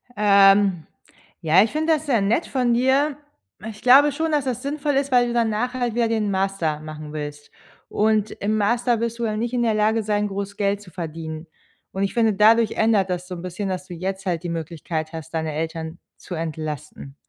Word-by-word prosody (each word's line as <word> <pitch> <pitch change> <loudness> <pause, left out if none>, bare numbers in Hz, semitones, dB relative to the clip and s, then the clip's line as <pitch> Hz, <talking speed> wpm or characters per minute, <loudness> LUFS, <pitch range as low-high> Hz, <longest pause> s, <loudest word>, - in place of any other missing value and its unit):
Ähm, 200 -3 +4 0.6
ja, 170 +3 +5
ich 220 - -2
finde 315 +1 +1
das 310 0 -2
sehr 245 -7 +2
nett 220 +11 +1
von 250 -3 +1
dir. 270 +4 +2 0.5
Ich 210 -1 -11
glaube 275 +4 +6
schon, 320 +3 -2
dass 295 -3 +1
das 250 -2 -2
sinnvoll 290 +1 -2
ist, 275 0 0
weil 245 -1 +4
du 240 - -3
danach 235 +1 0
halt 245 -3 -2
wieder 235 -1 +2
den 220 -2 0
Master 190 -5 -1
machen 155 -1 -9
willst. 145 -1 -7 0.4
Und 215 0 +1
im 215 +2 -2
Master 235 +3 +1
wirst 230 0 -2
du 235 - -1
ja 215 -1 -1
nicht 235 +2 -2
in 245 -1 +1
der 225 -2 +2
Lage 215 +1 +1
sein, 210 0 0
groß 200 0 -5
Geld 200 0 0
zu 190 -3 -14
verdienen. 160 -1 -6 0.4
Und 195 - -2
ich 195 - -1
finde, 225 -3 +2
dadurch 220 +2 +4
ändert 215 -4 +2
das 180 0 -3
so 180 - -6
'n 170 - -8
bisschen, 185 +3 -4
dass 185 0 -4
du 180 - -8
jetzt 190 +3 -4
halt 175 -2 -2
die 175 - -4
Möglichkeit 160 -1 -4
hast, 160 0 -8
deine 160 -1 -2
Eltern 160 +1 -4 0.2
zu 180 - -8
entlasten. 150 -3 -6
205 Hz, 210 wpm, -22 LUFS, 170-235 Hz, 0.6 s, glaube